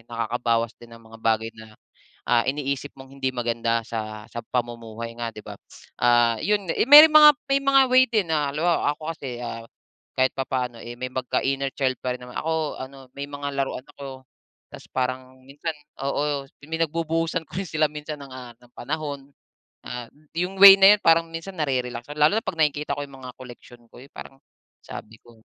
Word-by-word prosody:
nakakaba 115 0 0
din 120 - -15
ang 115 - -15
mga 115 0 -14
bagay 110 0 +1
na, 110 -1 -14 0.5
ah, 120 -1 +3
iniisip 140 0 -2
mong 135 0 -13
hindi 135 -1 -1
maganda 115 -2 -1
sa 110 -2 -6
sa 120 - -5
pamumuhay 115 -1 -4
nga 120 -1 -3
di 105 - -8
ba? - - -7 0.5
Ah, 120 -1 +4
yun 205 -2 0 0.2
may 300 +2 +12
mga 300 0 +9 0.2
may 275 0 +3
mga 275 0 +5
way 255 0 +7
din 215 -5 +1
na 150 -3 +1
halimbawa 165 0 +1
ako 155 - -19
kasi 130 -6 -7 0.8
kahit 130 0 +3
papaano, 125 -3 -3
eh, 120 - -8
may 130 - -3
pagka 130 -1 -1
inner 135 0 -1
child 130 -2 0
pa 125 -1 -1
rin 125 - -18
naman 125 - -12
ako 160 -1 -2
ano 135 0 -11
may 140 0 -5
mga 145 0 -5
laruan 135 -1 -5
ako, 135 -2 -9 0.5
ta's - - -11
parang 130 0 -3
minsan 145 +4 -5 0.3
oo 140 0 -1 0.2
may 160 +1 -4
pinagbubuhusan 165 +1 -1
ko - - -6
rin 185 - -8
sila 155 -1 +2
minsan 150 0 -7
ng, 140 - -11
ah, 125 -2 -9 0.2
panahon, 140 -3 -5 0.5
ah, 120 -1 -7 0.3
yung 180 +3 -2
way 195 -1 +12
na 195 +1 +8
yun - - -23
parang 165 0 +4
minsan 165 +4 -7
na-re-relax 125 -4 -2
lalo 150 +8 +4
na - - -4
pag - - -3
nakikita 150 -1 0
ko 145 - -4
yung 135 -1 -14
mga 125 -1 -9
koleksyon 120 -1 -13
ko - - -15 0.2
parang 135 - -11 0.5
sabi 110 - -9
ko 115 -2 -20
135 Hz, 185 wpm, -24 LUFS, 120-155 Hz, 0.8 s, may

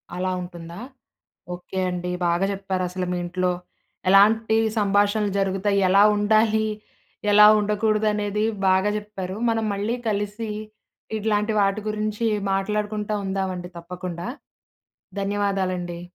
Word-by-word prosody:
అలా 185 +1 -1
ఉంటుందా? 170 0 -9 0.8
ఓకే 180 +1 -7
అండి. 180 0 -3 0.2
బాగా 170 +3 +2
చెప్పారసలు 185 -2 -3
మీ 180 - -1
ఇంట్లో 180 0 0 0.6
ఎలాంటి 220 +3 +5 0.2
సంభాషణలు 205 0 +2
జరుగుతయి, 195 +1 +1
ఎలా 195 +2 +6
ఉండాలి, 220 +1 +3 0.7
ఎలా 210 0 +9
ఉండకూడదనేది 210 0 0 0.2
బాగా 190 +2 +3
జెప్పారు. 200 -2 -6
మనం 225 -1 +1
మళ్ళీ 210 +5 -1
కలిసీ 210 +2 -2 0.7
ఇట్లాంటి 215 0 0
వాటి 195 +2 +1
గురించి 215 +1 -2 0.3
మాట్లాడుకుంటా 210 +1 -1
ఉందామండి 190 -2 -3
తప్పకుండా. 175 +2 -6 0.9
ధన్యవాదాలండి. 190 -3 -1
200 Hz, 100 wpm, -23 LUFS, 185-210 Hz, 0.9 s, ఎలా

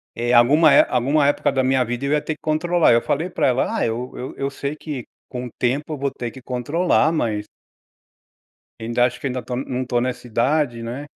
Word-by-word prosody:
eh, 120 +1 -1
alguma 145 +7 +6
é 140 - +7
alguma 140 +4 +2
época 145 - +1
da 130 - +1
minha 130 0 +2
vida 120 +3 -4
eu 140 - -1
ia 150 0 +2
ter 155 - -4
que - - -31
controlar. 160 0 +2
Eu 115 - +4
falei 160 +5 -1
para - - 0
ela. 130 0 0
Ah, - - +1
eu 120 +3 -3
eu 130 - -7
eu 135 - -2
sei 140 +2 -4
que 150 -5 -6 0.2
com 125 0 -6
o - - -7
tempo 140 +5 -1
eu - - -4
vou 140 0 -2
ter 120 -3 -5
que 130 +3 -13
controlar, 150 +7 +1
mas 110 -10 -1 1.4
Ainda 120 +2 +1
acho, 125 0 -3
que - - -3
ainda 125 -1 -3
tô 125 +2 -4
não 130 0 -3
tô 120 -1 0
nessa 125 0 -3
idade, 120 +1 0
né. 120 +5 -6
130 Hz, 225 wpm, -21 LUFS, 120-150 Hz, 1.4 s, é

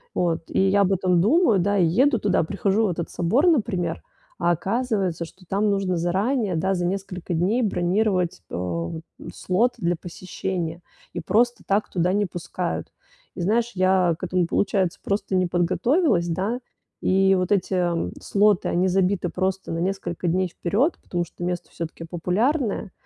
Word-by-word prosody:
Вот, 170 -2 0
и - - 0
я 200 +1 +4
об 195 - +2
этом 180 -2 +2
думаю, 230 - +4
да, 205 +3 +1
и 175 - +5
еду 240 - +3
туда, 200 -3 +2
прихожу 200 +5 +1
в - - 0
этот 170 -1 -4
собор, 225 - +2
например, 230 - +1 0.4
а 175 - +2
оказывается, 195 -2 -1
что 185 +2 -17
там 205 +3 +1
нужно 195 -2 0
заранее, 195 +5 0
да, 190 +4 +1
за 175 -1 -1
несколько 185 -1 -3
дней 190 +9 +1
бронировать, 185 - 0
э, 85 -2 -3 0.4
слот 225 +7 +1
для 175 -3 +1
посещения 175 -1 -5 0.3
и - - -4
просто 240 +3 +1
так 200 +2 +1
туда 180 0 +1
не 205 +1 +2
пускают. 175 0 -4 0.5
И - - -8
знаешь, 230 +6 +1
я 185 -2 +3
к - - -13
этому, 180 -1 +1
получается, 190 -1 0
просто 200 -1 -1
не 185 -1 +2
подготовилась, 185 - +2
да, 195 +9 -1 0.4
и 195 +1 +3
вот 185 +1 -1
эти, 190 -1 0
э, 175 -2 0
слоты, 205 -1 +2
они 180 +2 +2
забиты 185 -1 +1
просто 190 +2 -2
на 165 - -2
несколько 180 -1 -2
дней 185 +2 +1
вперед, 210 - 0
потому 175 -1 -2
что 175 - -10
место 180 -1 -3
всё-таки 165 0 -6
популярное. 195 - -1
185 Hz, 165 wpm, -24 LUFS, 175-205 Hz, 0.5 s, и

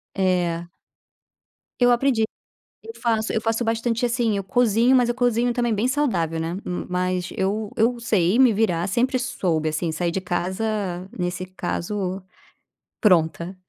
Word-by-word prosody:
É. 175 -3 0 1.1
Eu 245 0 +5
aprendi. 240 -2 +2 0.6
Eu 455 0 -8
faço 225 -2 0
eu 220 - 0
faço 225 +1 0
bastante 230 +1 0
assim, 235 -3 +1
eu 195 - -3
cozinho, 235 +4 +3
mas 245 -2 +4
eu 240 - +1
cozinho 245 -1 +1
também 240 -2 0
bem 215 +4 +1
saudável, 190 - 0
né. 165 +3 -3
M 180 - -4
mas 180 0 -1
eu 205 +3 -1
eu 235 +2 +2
sei 210 -2 +2
me 255 -4 +6
virar. 195 -4 +1
Sempre 255 +6 +1
soube, 175 -11 -1
assim, 160 +2 -2
sair 170 +2 -1
de 190 +2 -2
casa, 185 +1 -2
nesse 180 0 -3
caso, 185 +1 -3 0.8
pronta. 170 -2 +2
205 Hz, 150 wpm, -23 LUFS, 180-235 Hz, 1.1 s, me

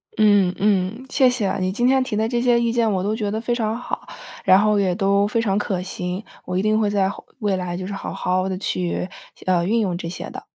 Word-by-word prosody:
嗯， 205 -4 +4
嗯， 205 +4 +1
谢 260 -2 +4
谢。 220 -6 0
你 185 0 0
今 240 +4 0
天 265 0 +4
提 240 -4 -3
的 220 +1 +1
这 240 0 0
些 240 -1 +4
意 235 -1 +1
见 230 -2 +2
我 185 -2 0
都 210 +2 0
觉 215 -2 -2
得 215 +2 -2
非 240 +1 -1
常 225 -2 -1
好， 245 - -5 0.4
然 190 +1 +6
后 210 0 +3
也 185 -3 +1
都 200 0 +2
非 220 +2 0
常 200 -3 +1
可 190 -3 -1
行。 180 +1 -4 0.2
我 180 - -2
一 185 - +2
定 215 +1 +2
会 210 -2 +2
在 200 -2 +2
后 - - -9
未 205 -4 +1
来 180 -1 -3
就 185 - -5
是 200 - -5
好 195 - -5
好 185 +1 0
地 185 - -2
去， 180 -2 -2 0.4
呃， 180 -2 +2
运 225 +5 +2
用 185 -5 0
这 170 - -5
些 180 - -6
的。 - - -9
205 Hz, 270 characters per minute, -22 LUFS, 185-225 Hz, 0.4 s, 然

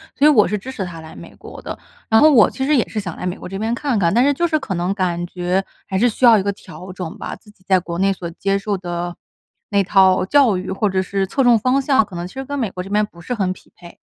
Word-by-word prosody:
所 290 +3 +4
以 - - +7
我 215 -8 +5
是 210 +1 -2
支 260 +6 -8
持 195 -7 -4
他 165 -2 -8
来 160 - -12
美 - - -12
国 - - -12
的。 - - -7 0.3
然 220 0 +4
后 310 - +7
我 230 -10 +5
其 265 - -4
实 300 - +3
也 240 - +1
是 215 - -4
想 180 -5 -6
来 - - -6
美 180 - -2
国 - - -9
这 195 - -5
边 220 +3 -1
看 255 0 -1
看， 170 -3 +2
但 240 - +4
是 285 - +4
就 345 +5 0
是 310 -2 0
可 200 -9 -4
能 175 +3 -1
感 175 -3 -1
觉， 180 +2 -2 0.2
还 190 - -2
是 240 +5 +3
需 235 - -4
要 235 -3 +8
一 190 - 0
个 200 0 -1
调 185 0 -11
整 180 +2 -7
吧， - - -6
自 210 - -20
己 200 -3 -22
在 190 -1 +4
国 170 -1 -6
内 195 +2 +2
所 175 -2 -7
接 195 +3 -1
受 200 -1 -2
的 175 -1 -5 0.5
那 200 -1 +2
套 190 -1 +4
教 265 -7 +4
育， 185 - -4
或 195 +2 0
者 190 -1 0
是 195 +1 -2
侧 270 - -1
重 240 -2 +5
方 255 +5 +1
向， 265 -5 +3
可 190 -3 -12
能 175 +1 -4
其 - - -15
实 270 0 -5
跟 285 0 -4
美 225 -5 -1
国 180 0 -6
这 195 - -10
边 210 +1 +2
不 170 - -18
是 245 +8 -5
很 190 -5 -1
匹 - - -11
配。 175 -1 -14
195 Hz, 330 characters per minute, -19 LUFS, 180-235 Hz, 0.5 s, 要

